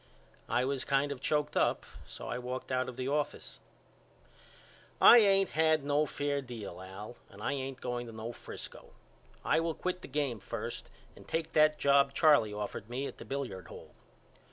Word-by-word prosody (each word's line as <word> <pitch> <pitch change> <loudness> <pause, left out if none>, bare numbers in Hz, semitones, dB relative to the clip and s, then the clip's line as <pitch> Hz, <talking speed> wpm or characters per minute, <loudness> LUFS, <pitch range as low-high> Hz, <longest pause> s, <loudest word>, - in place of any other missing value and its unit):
I 125 - +2
was 135 -1 -1
kind 140 +1 +1
of 140 -2 -6
choked 150 +1 0
up - - +2 0.2
so 60 - -8
I 125 - -3
walked 125 +1 -5
out 130 0 0
of 125 - -9
the 130 0 -3
office. 145 +1 -2 1.4
I 240 - +10
ain't 195 -2 +4
had 160 -1 +3
no 145 +1 +2
fair 145 0 -1
deal 110 -8 -8
Al 100 +5 -9
and 100 - -14
I - - 0
ain't 135 -1 -4
going 120 -1 -3
to - - -8
no 110 +1 -6
Frisco. - - -9 0.5
I - - +3
will 165 -1 -1
quit 180 0 -3
the - - -9
game 140 -5 -1
first 95 - -6 0.3
and - - -15
take 165 -1 -2
that 155 0 +5
job 140 0 +4
Charley 145 -10 +5
offered 105 +1 -5
me 130 +3 -3
at - - -7
the - - -9
billiard 120 -11 -4
hall. - - -12
135 Hz, 180 wpm, -32 LUFS, 120-150 Hz, 1.4 s, I